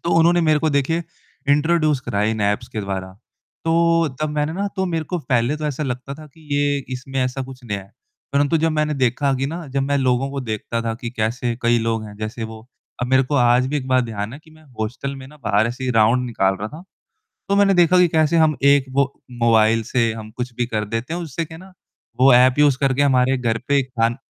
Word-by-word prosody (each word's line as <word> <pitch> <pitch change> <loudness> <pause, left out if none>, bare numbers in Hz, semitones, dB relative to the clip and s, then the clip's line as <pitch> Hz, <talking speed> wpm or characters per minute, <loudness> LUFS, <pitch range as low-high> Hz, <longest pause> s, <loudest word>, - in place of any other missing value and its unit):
तो 170 - 0
उन्होंने 175 +1 +4
मेरे 155 -1 +4
को 155 +1 0
देखिए 145 +4 0 0.5
इंट्रोड्यूस 155 -1 +2
करा 100 -4 -2
इन 110 0 0
ऐप्स 105 +4 0
के 110 - -4
द्वारा, 95 -1 -4 0.5
तो 165 0 +3
तब 155 - 0
मैंने 150 +1 -1
न 200 - 0
तो 190 - 0
मेरे 165 -3 -2
को 180 +1 -3
पहले 125 +3 +1
तो 155 - -4
ऐसा 150 0 -3
लगता 135 0 -4
था 155 +1 -12
कि 150 +1 -20
ये 145 0 +2 0.2
इसमें 135 +1 -4
ऐसा 130 +1 -3
कुछ 130 -1 -11
नया 105 -4 -3
है। 95 - -20 0.4
परंतु 145 +3 +2
जब 160 +1 +1
मैंने 150 0 0
देखा 135 +1 +1
कि 135 +1 -1
न, 165 +3 -6
जब 135 0 0
मैं 140 +1 0
लोगों 130 +1 +1
को 140 0 -4
देखता 115 0 -3
था 115 -1 -2
कि 120 - -4
कैसे 115 +2 -1
कई 120 0 +3
लोग 115 -1 -1
हैं, 105 - -10
जैसे 110 +2 -5
वो 110 0 -10 0.4
अब 125 - 0
मेरे 130 +1 +4
को 140 +3 -3
आज 125 0 +4
भी 150 +3 -1
एक 130 - -4
बार 130 0 +4
ध्यान 110 -2 -5
है 140 - -8
कि 160 - -19
मैं 155 0 -19 0.2
हॉस्टल 125 +5 -3
में 130 -1 -10
न 150 - -16
बाहर 105 +1 +2
ऐसे 125 +2 -5
ही 125 - 0
राउंड 115 +2 +3
निकाल 95 -5 +1
रहा 105 - -3
था। 155 +7 -11 0.7
तो 200 - +2
मैंने 200 -1 +4
देखा 180 0 +5
कि 180 - +5
कैसे 160 0 +2
हम 155 -2 +3
एक 140 -1 +5
वो 140 +1 +3 0.4
मोबाइल 115 -1 +4
से 115 -3 +2
हम 110 -1 -8
कुछ 125 0 -4
भी 120 0 -1
कर 110 -2 -2
देते 115 +9 -4
हैं, 175 - -3
उससे 165 0 -4
क्या 160 0 -11
है 185 - -13
न, - - -19 0.5
वो 135 0 +7
ऐप 130 +2 +5
यूज़ 145 -3 +4
करके 135 0 +2
हमारे 130 -1 +3
घर 115 -2 0
पे 140 -1 +3
खान 120 -2 -1
130 Hz, 240 wpm, -21 LUFS, 115-150 Hz, 0.7 s, वो